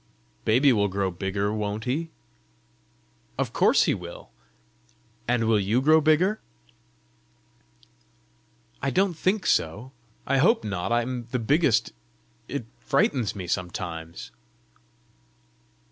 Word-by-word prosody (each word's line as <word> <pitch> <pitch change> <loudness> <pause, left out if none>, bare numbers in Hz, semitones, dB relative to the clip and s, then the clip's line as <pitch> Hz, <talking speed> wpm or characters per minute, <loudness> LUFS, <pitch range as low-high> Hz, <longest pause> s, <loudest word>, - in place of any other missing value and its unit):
"Baby 130 +5 +4
will 105 -2 +2
grow 95 -1 -1
bigger, 100 +3 -2
won't 105 0 -3
he?" 155 +7 -2 1.3
"Of - - -2
course - - +4
he - - +2
will!" 85 -2 -9 1.0
"And 120 -1 +1
will 110 -1 +3
you 105 +5 +1
grow 155 +4 +5
bigger?" 170 +8 +2 2.4
"I 135 - 0
don't 190 +7 +1
think 185 +5 0
so. 105 +11 0 0.3
I 135 - +1
hope 225 - +4
not. 95 -1 -3
I 120 0 +2
am 120 -1 -5
the 125 - -1
biggest. 120 -2 +2 0.5
It 140 -5 -4
frightens 125 -2 +1
me 95 -3 -5
sometimes." 85 -2 -5
115 Hz, 115 wpm, -25 LUFS, 100-140 Hz, 2.4 s, grow